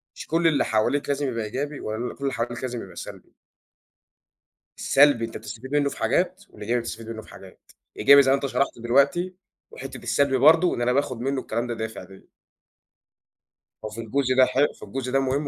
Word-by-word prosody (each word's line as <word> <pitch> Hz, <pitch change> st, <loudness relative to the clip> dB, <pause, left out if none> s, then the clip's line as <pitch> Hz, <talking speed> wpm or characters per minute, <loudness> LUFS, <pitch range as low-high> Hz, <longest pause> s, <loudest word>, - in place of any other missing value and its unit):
مش -, -, -9 dB
كل 165 Hz, +1 st, +2 dB
اللي 150 Hz, -4 st, +2 dB
حواليك 125 Hz, +7 st, 0 dB
لازم 140 Hz, 0 st, 0 dB
يبقى 115 Hz, -3 st, -3 dB
إيجابي 140 Hz, +6 st, -4 dB
ولا 110 Hz, +3 st, -4 dB
كل -, -, -22 dB
اللي 135 Hz, -1 st, -1 dB
حواليك 120 Hz, 0 st, -3 dB
لازم 125 Hz, -2 st, -4 dB
يبقى -, -, -13 dB
سلبي. -, -, -10 dB, 1.4 s
السلبي 140 Hz, -4 st, +4 dB
أنت 115 Hz, -, -8 dB
بتستفيد 115 Hz, +5 st, -9 dB
منُّه 145 Hz, -1 st, +2 dB
في -, -, -9 dB
حاجات، 185 Hz, +2 st, 0 dB
والإيجابي 115 Hz, +4 st, -2 dB
بتستفيد 115 Hz, -1 st, -7 dB
منُّه 110 Hz, -1 st, -6 dB
في -, -, -17 dB
حاجات. 95 Hz, -1 st, -15 dB, 0.3 s
إيجابي 140 Hz, +6 st, +7 dB
زي 135 Hz, -, +2 dB
ما -, -, +5 dB
أنت 140 Hz, -, -3 dB
شرَحت 140 Hz, -2 st, -1 dB
دلوقتي، 140 Hz, +10 st, +2 dB, 0.4 s
وحِتّة 135 Hz, 0 st, -8 dB
السلبي 140 Hz, -2 st, +1 dB
برضه 160 Hz, +6 st, +5 dB
إن -, -, -4 dB
أنا 125 Hz, +1 st, +2 dB
باخد 130 Hz, -3 st, -1 dB
منّه 135 Hz, +1 st, -1 dB
الكلام 115 Hz, +1 st, -3 dB
ده 120 Hz, -, -3 dB
دافِع 110 Hz, -3 st, -6 dB
ليَّ. 95 Hz, +1 st, -16 dB, 1.6 s
هو -, -, -4 dB
في 110 Hz, +2 st, -7 dB
الجزء 130 Hz, +3 st, 0 dB
ده 130 Hz, -, +7 dB
ح 130 Hz, -, -5 dB, 0.2 s
في -, -, -15 dB
الجزء 130 Hz, +5 st, -5 dB
ده 135 Hz, -, +3 dB
مهم 135 Hz, +2 st, -1 dB
130 Hz, 200 wpm, -24 LUFS, 115-140 Hz, 1.6 s, إيجابي